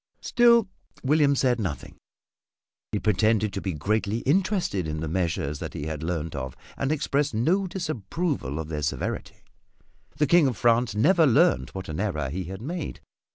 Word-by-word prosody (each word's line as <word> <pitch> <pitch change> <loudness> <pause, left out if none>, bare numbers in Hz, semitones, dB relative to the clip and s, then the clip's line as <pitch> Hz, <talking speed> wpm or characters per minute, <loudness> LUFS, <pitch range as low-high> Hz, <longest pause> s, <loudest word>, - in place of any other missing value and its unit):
Still 235 -3 +4 0.4
William 140 0 +3
said 125 -3 +2
nothing. 90 -9 -4 1.0
He - - 0
pretended 110 0 +2
to 100 - -3
be 95 - -2
greatly 105 +7 -1
interested 170 - +1
in 75 0 -3
the 80 - -3
measures 80 -4 -1
that - - -6
he 70 - -4
had 80 -1 -4
learned 80 -2 -3
of 65 -2 -5 0.2
and 135 +1 -1
expressed 145 -4 0
no 180 - +2
disapproval 155 - -3
of 80 -1 -4
their 75 -1 -4
severity. 75 - -3 0.7
The 150 - +3
King 165 0 +5
of 125 - -2
France 120 -2 +2
never 160 - +4
learned 160 +8 +3
what 95 -1 -6
an 80 0 -5
error 75 -10 -1
he 90 +3 -3
had 95 +5 -7
made. 170 +3 -5
110 Hz, 165 wpm, -26 LUFS, -, 1.0 s, King